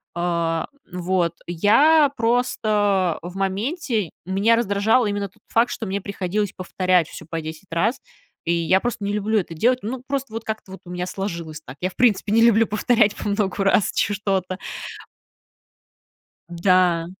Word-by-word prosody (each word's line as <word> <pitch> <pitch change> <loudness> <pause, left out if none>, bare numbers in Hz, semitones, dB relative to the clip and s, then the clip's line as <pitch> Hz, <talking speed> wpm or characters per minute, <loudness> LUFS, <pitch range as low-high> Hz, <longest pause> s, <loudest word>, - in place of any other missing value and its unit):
а, 170 -2 -1 0.2
вот. 180 -1 0
Я 275 - +4
просто 210 -6 +1
в 175 +2 -8
моменте, 215 - -1 0.2
меня 200 +5 +3
раздражал 220 +2 +2
именно 205 -1 -2
тот - - -30
факт, 235 +2 +2
что 220 - -4
мне 195 +1 -2
приходилось 200 0 -2
повторять 185 -2 +1
всё 160 - -10
по 165 0 -4
10 160 +3 -9
раз, 205 +10 +1 0.5
и 170 - +1
я 170 +3 +3
просто 240 -4 -3
не 205 - -1
люблю 210 +1 +1
это 170 -3 -5
делать. 250 +9 +2
Ну, 250 +3 -4
просто 275 -4 -3
вот 225 0 -4
как-то 215 -3 -5
вот - - -10
у 175 - -9
меня 180 0 -3
сложилось 170 -5 -5
так. 135 -1 -11
Я, 185 - 0
в - - -18
принципе, 215 -4 +2
не 230 - +5
люблю 230 -1 +5
повторять 215 0 +2
по - - -5
многу 200 -1 0
раз 195 0 +3
чё 205 - +1
что-то. 190 -2 -2 1.9
Да. 175 -1 +2
200 Hz, 165 wpm, -22 LUFS, 180-225 Hz, 1.9 s, не